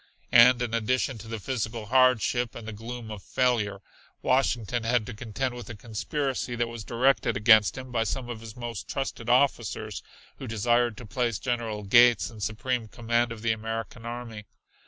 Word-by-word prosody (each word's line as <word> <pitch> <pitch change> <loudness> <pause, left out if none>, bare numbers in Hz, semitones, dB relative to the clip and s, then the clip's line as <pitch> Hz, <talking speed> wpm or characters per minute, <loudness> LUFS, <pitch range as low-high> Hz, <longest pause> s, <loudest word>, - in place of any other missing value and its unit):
And 125 +1 +7
in 115 -2 -3
addition 120 +2 0
to 110 - -10
the 115 0 -4
physical 115 -1 -3
hardship 125 0 +3
and 115 -2 -8
the 110 - -5
gloom 115 +1 -7
of 105 -2 -7
failure, 105 -5 0 0.4
Washington 120 -3 +1
had 115 -1 +1
to 120 - -7
contend 120 +4 -3
with 120 -1 -9
a 115 - -6
conspiracy 125 +4 -3
that 120 0 0
was 115 -1 -7
directed 125 0 +1
against 110 0 +5
him 130 -1 -8
by 115 -2 +1
some 125 +3 -3
of 120 -2 -6
his 110 -2 -10
most 120 -3 -6
trusted 135 -3 -4
officers, 120 -5 +1 0.4
who 130 - -7
desired 120 +1 +1
to 125 - -9
place 115 0 -1
General 115 -4 -3
Gates 120 +4 +5
in 110 - -12
supreme 120 +2 -2
command 120 +1 0
of 115 -1 -8
the 115 - +2
American 115 +1 -4
Army. 115 -3 -7
115 Hz, 180 wpm, -27 LUFS, 110-125 Hz, 0.4 s, And